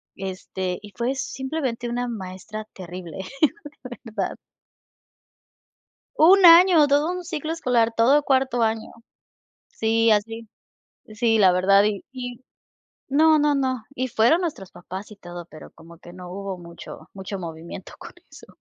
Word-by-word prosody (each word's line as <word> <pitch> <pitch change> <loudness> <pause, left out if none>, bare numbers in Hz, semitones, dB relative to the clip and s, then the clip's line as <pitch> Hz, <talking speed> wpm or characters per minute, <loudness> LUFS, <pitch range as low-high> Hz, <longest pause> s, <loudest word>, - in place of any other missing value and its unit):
este, 185 -1 -5
y 205 -1 -12
fue 240 +3 -1
simplemente 265 -3 -4
una 245 +1 -2
maestra 210 0 -7
terrible 180 -2 -9 0.7
de 245 -1 -8 0.2
verdad. 195 -3 -2 1.8
¡1 370 +4 +6
año! 335 -2 +8
Todo 290 +4 +2
un 360 0 -5
ciclo 315 -2 -4
escolar, 240 -7 +1
todo 275 +6 +4
cuarto 260 -3 +1
año. 220 0 -1 0.8
Sí, 225 0 +1
así. 225 +2 -1 0.7
Sí, 225 0 +2
la 190 -3 +6
verdad, 195 +2 +4
y 210 -2 -1
y 245 -1 -7 0.7
no, 310 +3 +5
no, 295 0 +3
no, 260 -4 -1
y 255 -1 -1
fueron 235 +11 +3
nuestros 290 - -5
papás 190 +4 -9
y - - -10
todo 175 -3 -9
pero 155 - -13
como 165 +1 -16
que 175 - -13
no 180 -1 -10
hubo 195 -1 -5
mucho 170 -1 -11
mucho 195 0 -6
movimiento 165 +1 -8
con - - -10 0.2
eso. - - -14
225 Hz, 140 wpm, -23 LUFS, 190-270 Hz, 1.8 s, año